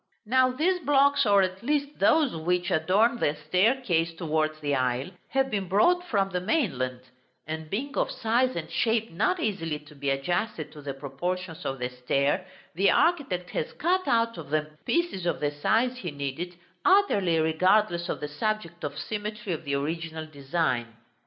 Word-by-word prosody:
Now 255 Hz, +3 st, +4 dB
these 355 Hz, +8 st, +1 dB
blocks, 280 Hz, -3 st, +3 dB
or 200 Hz, -1 st, +5 dB
at 185 Hz, +1 st, -3 dB
least 285 Hz, +2 st, -1 dB
those 310 Hz, -, +4 dB
which 175 Hz, +2 st, 0 dB
adorn 205 Hz, +9 st, +3 dB
the 145 Hz, -, +1 dB
staircase 180 Hz, -, +1 dB
towards 155 Hz, -2 st, -1 dB
the 145 Hz, -1 st, -1 dB
aisle, 130 Hz, +4 st, 0 dB, 0.2 s
have 270 Hz, 0 st, 0 dB
been 195 Hz, -3 st, -1 dB
brought 350 Hz, -, +3 dB
from 195 Hz, -, +1 dB
the 180 Hz, -1 st, -1 dB
mainland; 135 Hz, -, 0 dB, 0.4 s
and, 160 Hz, 0 st, -5 dB
being 265 Hz, -, -3 dB
of -, -, +1 dB
size 255 Hz, +1 st, +1 dB
and 160 Hz, -2 st, -4 dB
shape 225 Hz, +4 st, +1 dB
not 365 Hz, -, +1 dB
easily 175 Hz, -, -1 dB
to 150 Hz, 0 st, -16 dB
be 140 Hz, -1 st, -3 dB
adjusted 155 Hz, +3 st, -1 dB
to 150 Hz, -, -11 dB
the 140 Hz, -1 st, -5 dB
proportions 165 Hz, +5 st, -4 dB
of 135 Hz, -, -3 dB
the 125 Hz, -1 st, -2 dB
stair, 140 Hz, +8 st, 0 dB, 0.3 s
the 190 Hz, +4 st, +3 dB
architect 275 Hz, -, +1 dB
has -, -, -3 dB
cut 370 Hz, +4 st, 0 dB
out 230 Hz, -4 st, +2 dB
of 150 Hz, -4 st, -9 dB
them 155 Hz, 0 st, -1 dB
pieces 335 Hz, -, 0 dB
of 170 Hz, -, 0 dB
the 145 Hz, -1 st, 0 dB
size 225 Hz, +12 st, +1 dB
he 185 Hz, -8 st, -4 dB
needed, 145 Hz, +5 st, -5 dB, 0.3 s
utterly 205 Hz, -, +4 dB
regardless 175 Hz, +3 st, +2 dB
of -, -, -3 dB
the 150 Hz, -, -2 dB
subject 170 Hz, +2 st, -3 dB
or 145 Hz, -1 st, -3 dB
symmetry 210 Hz, -1 st, -4 dB
of 160 Hz, 0 st, -6 dB
the 140 Hz, -1 st, 0 dB
original 160 Hz, +2 st, -3 dB
design. 135 Hz, -6 st, -2 dB
180 Hz, 170 wpm, -27 LUFS, 150-230 Hz, 0.4 s, or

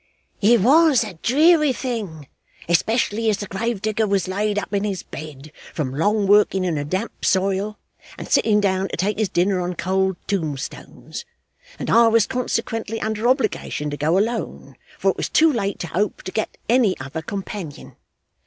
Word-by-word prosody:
'It 230 Hz, +3 st, +5 dB
WAS 285 Hz, -, +5 dB
a 210 Hz, -4 st, -7 dB
dreary 305 Hz, +3 st, +4 dB
thing, 215 Hz, -, -5 dB, 0.4 s
especially 220 Hz, +5 st, +1 dB
as 210 Hz, -, +1 dB
the 205 Hz, -, -5 dB
grave 210 Hz, +1 st, -3 dB
digger 215 Hz, 0 st, 0 dB
was 195 Hz, -3 st, 0 dB
laid 205 Hz, +2 st, -1 dB
up 205 Hz, 0 st, -3 dB
in 200 Hz, 0 st, +1 dB
his 195 Hz, -4 st, -3 dB
bed, 150 Hz, -1 st, -9 dB, 0.2 s
from 135 Hz, -5 st, -2 dB
long 205 Hz, +8 st, +1 dB
working 200 Hz, -1 st, +4 dB
in 175 Hz, -3 st, 0 dB
a 145 Hz, -, -2 dB
damp 185 Hz, +10 st, -4 dB
soil 195 Hz, +2 st, +1 dB, 0.4 s
and -, -, -7 dB
sitting 210 Hz, -2 st, +3 dB
down 195 Hz, -1 st, +1 dB
to -, -, -5 dB
take 200 Hz, +4 st, -1 dB
his 215 Hz, -3 st, +1 dB
dinner 185 Hz, +1 st, +1 dB
on 180 Hz, 0 st, -3 dB
cold 190 Hz, +1 st, 0 dB
tombstones, 155 Hz, -, -5 dB, 0.5 s
and -, -, -3 dB
I 235 Hz, 0 st, +6 dB
was 225 Hz, -1 st, +4 dB
consequently 225 Hz, -3 st, -2 dB
under 220 Hz, +1 st, -1 dB
obligation 215 Hz, -, 0 dB
to -, -, -3 dB
go 155 Hz, +5 st, +1 dB
alone, 225 Hz, +3 st, -2 dB, 0.2 s
for -, -, +2 dB
it -, -, -10 dB
was -, -, -2 dB
too 320 Hz, -1 st, +4 dB
late 200 Hz, -4 st, -2 dB
to 175 Hz, -, -4 dB
hope 205 Hz, +5 st, -1 dB
to 185 Hz, -, -6 dB
get 220 Hz, -, -3 dB
any 235 Hz, -5 st, +3 dB
other 135 Hz, +5 st, -5 dB
companion. 195 Hz, -4 st, -7 dB
205 Hz, 175 wpm, -22 LUFS, 185-225 Hz, 0.5 s, I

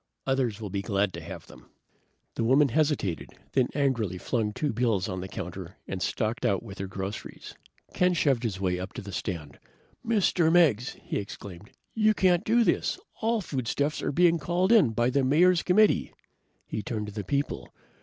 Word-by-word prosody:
Others 130 Hz, -5 st, 0 dB
will 105 Hz, -4 st, -6 dB
be 100 Hz, -, -2 dB
glad 100 Hz, -1 st, 0 dB
to -, -, -6 dB
have -, -, -8 dB
them." -, -, -16 dB, 0.6 s
The -, -, -2 dB
woman 135 Hz, +5 st, +4 dB
hesitated, 145 Hz, -, 0 dB, 0.2 s
then 130 Hz, -2 st, +2 dB
angrily 120 Hz, -, 0 dB
flung 110 Hz, +2 st, -1 dB
two 145 Hz, +4 st, -2 dB
bills 110 Hz, -5 st, +1 dB
on 95 Hz, -2 st, -4 dB
the 95 Hz, -, -5 dB
counter 95 Hz, -3 st, -7 dB
and 95 Hz, -1 st, -4 dB
stalked 110 Hz, +5 st, -1 dB
out 100 Hz, +1 st, +1 dB
with 100 Hz, -4 st, -10 dB
her 95 Hz, -, -3 dB
groceries. 95 Hz, +1 st, -7 dB, 0.4 s
Ken 180 Hz, 0 st, +2 dB
shoved 140 Hz, -7 st, +2 dB
his 105 Hz, -6 st, -3 dB
way 90 Hz, -2 st, 0 dB
up 95 Hz, +1 st, -6 dB
to -, -, -7 dB
the 100 Hz, -, -8 dB
stand. 85 Hz, -6 st, -5 dB, 0.4 s
"Mr. 190 Hz, -7 st, +2 dB
Meggs," 145 Hz, -9 st, +3 dB
he -, -, -3 dB
exclaimed. 100 Hz, 0 st, -9 dB, 0.2 s
"You 215 Hz, -1 st, +3 dB
can't 180 Hz, -1 st, +3 dB
do 235 Hz, +2 st, +3 dB
this! -, -, +1 dB, 0.2 s
All 225 Hz, 0 st, +1 dB
foodstuffs 140 Hz, -1 st, -2 dB
are -, -, -1 dB
being 170 Hz, +2 st, +4 dB
called 175 Hz, +5 st, +1 dB
in 215 Hz, -, +6 dB
by 120 Hz, +3 st, +1 dB
the 140 Hz, +1 st, +2 dB
Mayor's 170 Hz, +6 st, +4 dB
committee." 210 Hz, +3 st, +3 dB, 0.5 s
He 110 Hz, -, -4 dB
turned 105 Hz, -1 st, -3 dB
to 105 Hz, -, -8 dB
the 105 Hz, -1 st, -4 dB
people. 140 Hz, +8 st, -2 dB
120 Hz, 185 wpm, -27 LUFS, 100-160 Hz, 0.6 s, in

